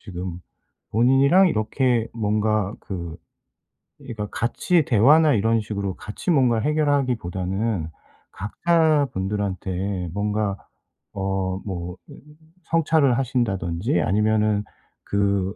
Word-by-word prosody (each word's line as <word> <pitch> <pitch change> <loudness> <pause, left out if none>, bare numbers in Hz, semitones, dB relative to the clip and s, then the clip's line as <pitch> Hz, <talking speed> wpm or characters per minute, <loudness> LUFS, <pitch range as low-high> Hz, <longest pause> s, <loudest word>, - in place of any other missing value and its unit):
지금 90 -3 -7 0.5
본인이랑 135 - +5
이렇게 115 0 0
뭔가 105 -2 0
그 85 -4 -6 0.8
그러니까 110 -3 -6
같이 155 +7 +1
대화나 145 +8 +5
이런 115 +1 +2
식으로 100 -2 -3
같이 105 - -4
뭔가를 120 -6 +2
해결하기보다는 115 - -1 0.4
각자 155 - +1
분들한테 95 -1 -3
뭔가 105 0 -1 0.6
어 95 -1 -2
뭐 90 -2 -5 0.7
성찰을 155 -6 +2
하신다든지 100 -9 -1
아니면은 105 +3 +1 0.4
그 100 -1 0
105 Hz, 235 characters per minute, -23 LUFS, 95-125 Hz, 0.8 s, 본인이랑